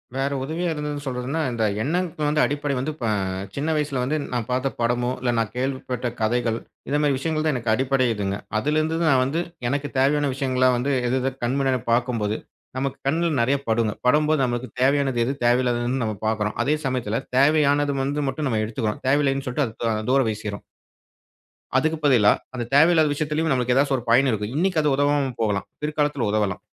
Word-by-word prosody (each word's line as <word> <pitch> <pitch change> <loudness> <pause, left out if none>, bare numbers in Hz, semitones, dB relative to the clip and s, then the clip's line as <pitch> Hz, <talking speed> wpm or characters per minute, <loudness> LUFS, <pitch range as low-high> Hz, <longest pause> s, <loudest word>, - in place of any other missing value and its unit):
வேற 135 +1 0
உதவியா 165 +5 -2
இருந்ததுன்னு 150 -1 -4
சொல்றதுன்னா, 130 +4 -3
இந்த 115 -2 -1 0.2
எண்ணத்துக்கு 155 -2 0
அடிப்படை 145 0 -1
வந்து 135 +5 -2
ப - - -1 0.5
சின்ன 145 +3 -2
வயசுல 145 -4 -1
வந்து 145 +5 0 0.2
நான் 120 -3 -2
பார்த்த 130 +2 0
படமோ, 120 +1 +1
இல்ல 125 -1 +1
நான் 110 -2 -1
கேள்விப்பட்ட 130 -1 -2
கதைகள். 115 +1 +1 0.3
இந்த 145 - +1
மாதிரி 145 -2 +2
விஷயங்கள்தான் 155 +1 0
எனக்கு 115 -3 0
அடிப்படை 130 +2 +1
இதுங்க. 100 -2 -2 0.2
அதுல 150 +6 0
இருந்து 160 +1 -1
நான் 130 -3 +4
வந்து 145 +6 -1 0.3
எனக்குத் 140 +1 -3
தேவையான 145 +2 +2
விஷயங்களா 130 -2 +2
வந்து 135 +3 0
எதெது 130 +2 0
கண்ணு 130 +4 0
முன்னாடி, 130 -3 +1
பார்க்கும்போது 115 -3 0 0.4
நமக்குக் 135 0 -4
கண்ணுல 165 +4 +1
நிறைய 135 +4 +2
படும்ங்க. 110 -1 +1
படும்போது 150 +3 +3
நமக்குத் 120 0 -4
தேவையானது 135 -2 +2
எது? 135 - -1
தேவையில்லாததுன்னு 120 +1 +1
நாம 110 -2 -3
பாக்குறோம். 105 -1 -1
அதே 145 +5 +2
சமயத்துல 125 -5 -1 0.2
தேவையானது 145 0 +4 0.4
மட்டும் 145 +2 -2
நம்ம 110 -3 0
எடுத்துக்குறோம். 110 0 -3
தேவையில்லைன்னு 135 0 +2
சொல்லிட்டு 130 +2 0
அத 110 - -11
த 115 - +2 0.2
தூர 135 0 +4
வீசிருறோம். 105 -1 -5 1.1
அதுக்கு 160 +4 +1
பதிலா 115 -7 +5 0.2
அந்தத் 120 -1 -5
தேவையில்லாத 160 0 +5
விஷயத்துலயும் 155 +2 -1
நமக்கு 125 -1 +1
ஏதாவது 135 0 +3
ஒரு 120 - -7
பயன் 130 +3 +5
இருக்கும். 105 +1 -3
இன்னைக்கு 175 -1 +2
அது 145 -2 +2
உதவாம 145 -1 +1
போகலாம். 105 -3 0 0.2
பிற்காலத்தில் 150 -5 0
உதவலாம். 105 -3 0
135 Hz, 170 wpm, -23 LUFS, 120-145 Hz, 1.1 s, பதிலா